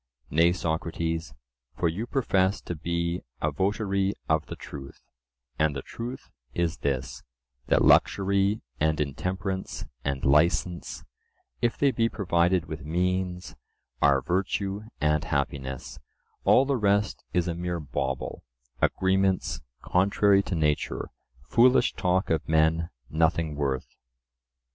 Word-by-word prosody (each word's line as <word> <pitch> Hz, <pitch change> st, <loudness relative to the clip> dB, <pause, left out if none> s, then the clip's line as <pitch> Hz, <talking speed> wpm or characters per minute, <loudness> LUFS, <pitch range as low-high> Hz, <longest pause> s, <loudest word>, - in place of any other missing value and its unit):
Nay, 85 Hz, +3 st, +5 dB
Socrates, 80 Hz, -4 st, -2 dB, 0.4 s
for -, -, +2 dB
you 100 Hz, +9 st, -2 dB
profess 100 Hz, -8 st, +1 dB
to -, -, -5 dB
be 85 Hz, +2 st, -2 dB, 0.2 s
a 75 Hz, -, 0 dB
votary 100 Hz, +3 st, 0 dB
of 80 Hz, -1 st, +1 dB
the -, -, -6 dB
truth, 70 Hz, -1 st, -10 dB, 0.6 s
and 75 Hz, -2 st, +2 dB
the 70 Hz, -, -4 dB
truth 125 Hz, +3 st, -7 dB, 0.2 s
is 85 Hz, -1 st, 0 dB
this:—that 65 Hz, -2 st, -2 dB
luxury 100 Hz, +2 st, +3 dB, 0.2 s
and 80 Hz, 0 st, +2 dB
intemperance 90 Hz, +6 st, -3 dB, 0.2 s
and 70 Hz, -2 st, -2 dB
licence, 85 Hz, +5 st, +2 dB, 0.6 s
if 120 Hz, -1 st, +1 dB
they 140 Hz, -1 st, +3 dB
be 115 Hz, -2 st, +1 dB
provided 90 Hz, -3 st, +1 dB
with 80 Hz, -4 st, -7 dB
means, 90 Hz, +3 st, -1 dB, 0.5 s
are 70 Hz, -2 st, +4 dB
virtue 95 Hz, +2 st, -1 dB, 0.2 s
and 75 Hz, +1 st, +2 dB
happiness—all 70 Hz, -, -1 dB
the 140 Hz, -1 st, +1 dB
rest 105 Hz, -1 st, +1 dB
is 90 Hz, -1 st, +1 dB
a 85 Hz, -, 0 dB
mere 85 Hz, 0 st, -3 dB
bauble, 65 Hz, -2 st, -3 dB, 0.4 s
agreements 95 Hz, 0 st, +1 dB, 0.2 s
contrary 100 Hz, +1 st, +3 dB
to 95 Hz, -, -3 dB
nature, 75 Hz, -2 st, 0 dB, 0.3 s
foolish 120 Hz, -, +4 dB
talk 90 Hz, 0 st, 0 dB
of 80 Hz, -2 st, 0 dB
men, 80 Hz, +1 st, +3 dB, 0.2 s
nothing 80 Hz, 0 st, +1 dB
worth. 70 Hz, -3 st, -2 dB
85 Hz, 115 wpm, -27 LUFS, 75-95 Hz, 0.6 s, Nay